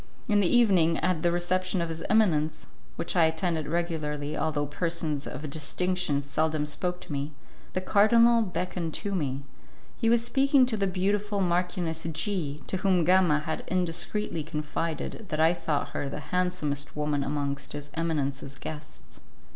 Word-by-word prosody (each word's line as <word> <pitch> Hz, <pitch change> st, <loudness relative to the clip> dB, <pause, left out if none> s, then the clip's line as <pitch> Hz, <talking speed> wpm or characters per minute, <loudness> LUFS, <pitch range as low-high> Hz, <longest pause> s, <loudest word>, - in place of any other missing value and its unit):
In 210 Hz, -3 st, +3 dB
the 195 Hz, -, +3 dB
evening, 185 Hz, -8 st, +4 dB
at 180 Hz, -3 st, +1 dB
the 175 Hz, -, +2 dB
reception 185 Hz, +2 st, 0 dB
of 170 Hz, -1 st, -1 dB
his 165 Hz, 0 st, -5 dB
eminence, 155 Hz, -8 st, +2 dB, 0.3 s
which 170 Hz, -, -2 dB
I 170 Hz, -2 st, +6 dB
attended 160 Hz, -1 st, 0 dB
regularly, 155 Hz, -3 st, -2 dB
although 150 Hz, -2 st, 0 dB
persons 155 Hz, -1 st, -1 dB
of 150 Hz, -, -5 dB
distinction 160 Hz, +1 st, -1 dB
seldom 155 Hz, +1 st, 0 dB
spoke 180 Hz, +4 st, -2 dB
to 180 Hz, -, -9 dB
me, 145 Hz, +1 st, -3 dB, 0.4 s
the 185 Hz, -, -1 dB
cardinal 230 Hz, +4 st, +5 dB
beckoned 180 Hz, -4 st, -3 dB
to 205 Hz, -1 st, -3 dB
me. 140 Hz, -6 st, -2 dB, 0.5 s
He 225 Hz, -, +1 dB
was 235 Hz, 0 st, +3 dB
speaking 275 Hz, +1 st, +4 dB
to 245 Hz, -3 st, 0 dB
the 200 Hz, -2 st, +1 dB
beautiful 200 Hz, +2 st, 0 dB
Marchioness 175 Hz, -2 st, 0 dB
G, 155 Hz, -5 st, -2 dB
to 190 Hz, -, -2 dB
whom 185 Hz, -2 st, +2 dB
Gama 175 Hz, -3 st, +4 dB
had 155 Hz, +1 st, -3 dB
indiscreetly 175 Hz, +1 st, -1 dB
confided 155 Hz, +6 st, -4 dB
that 155 Hz, -, -2 dB
I 160 Hz, +2 st, +5 dB
thought 160 Hz, -4 st, -2 dB
her 140 Hz, -, -3 dB
the 145 Hz, -, -5 dB
handsomest 180 Hz, -6 st, -1 dB
woman 150 Hz, -1 st, 0 dB
amongst 140 Hz, 0 st, -3 dB
his 145 Hz, 0 st, -7 dB
eminence's 140 Hz, -4 st, -2 dB
guests. 155 Hz, -1 st, -9 dB
165 Hz, 155 wpm, -28 LUFS, 150-185 Hz, 0.5 s, I